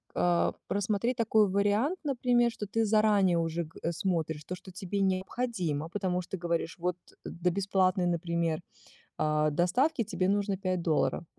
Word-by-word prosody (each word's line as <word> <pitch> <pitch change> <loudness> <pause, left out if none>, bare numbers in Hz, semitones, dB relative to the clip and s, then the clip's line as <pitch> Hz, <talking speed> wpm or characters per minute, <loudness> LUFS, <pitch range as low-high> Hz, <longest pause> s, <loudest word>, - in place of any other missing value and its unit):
а, 175 -1 +2
просмотреть 210 +4 0
такой 220 -3 +3
вариант, 205 - +1
например, 245 -4 +2
что 215 - -6
ты 225 +3 0
заранее 210 -4 +3
уже 165 +1 -1
го 160 - -16
смотришь 160 -3 -2
то, 180 - -4
что 185 +1 -13
тебе 190 +2 -3
необходимо, 185 -5 -1
потому 185 -1 -1
что 175 - -14
ты 190 - -2
говоришь, 170 0 -2
вот 180 0 -1 0.3
до 180 +1 -1
бесплатной, 190 -1 +1
например, 170 -1 -1 0.6
а, 155 0 +2
доставки 210 - +2
тебе 190 -3 -1
нужно 200 -1 +1
5 185 -2 -1
долларов. 165 +1 0
185 Hz, 155 wpm, -30 LUFS, 170-210 Hz, 0.6 s, такой